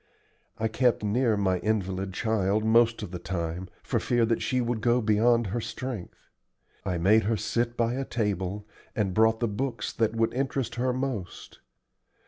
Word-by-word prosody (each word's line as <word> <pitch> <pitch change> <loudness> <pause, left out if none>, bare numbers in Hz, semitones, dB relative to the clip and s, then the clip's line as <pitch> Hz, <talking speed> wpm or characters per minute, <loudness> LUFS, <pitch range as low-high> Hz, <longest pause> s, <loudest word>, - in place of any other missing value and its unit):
I 110 - 0
kept 115 0 +1
near 110 +1 +2
my 95 -2 +1
invalid 95 -3 -1
child 105 +1 0
most 115 +1 +4
of - - -6
the 90 - -5
time, 85 0 -4
for - - 0
fear 120 -2 +2
that 115 0 0
she 130 -4 0
would 120 -2 -1
go 120 +2 +3
beyond 115 +2 +3
her 120 - -1
strength. 115 -2 -6 0.6
I 90 -2 -1
made 105 +6 +4
her 110 +1 +1
sit 115 +3 -1
by 115 0 +1
a 135 +2 -2
table, 105 -4 -2 0.3
and 100 -4 0
brought 110 +2 +3
the 120 - +2
books 115 +1 -3
that 115 0 0
would 115 0 +1
interest 135 -1 -1
her 125 +1 0
most. 125 -8 -4
110 Hz, 170 wpm, -27 LUFS, 100-120 Hz, 0.6 s, most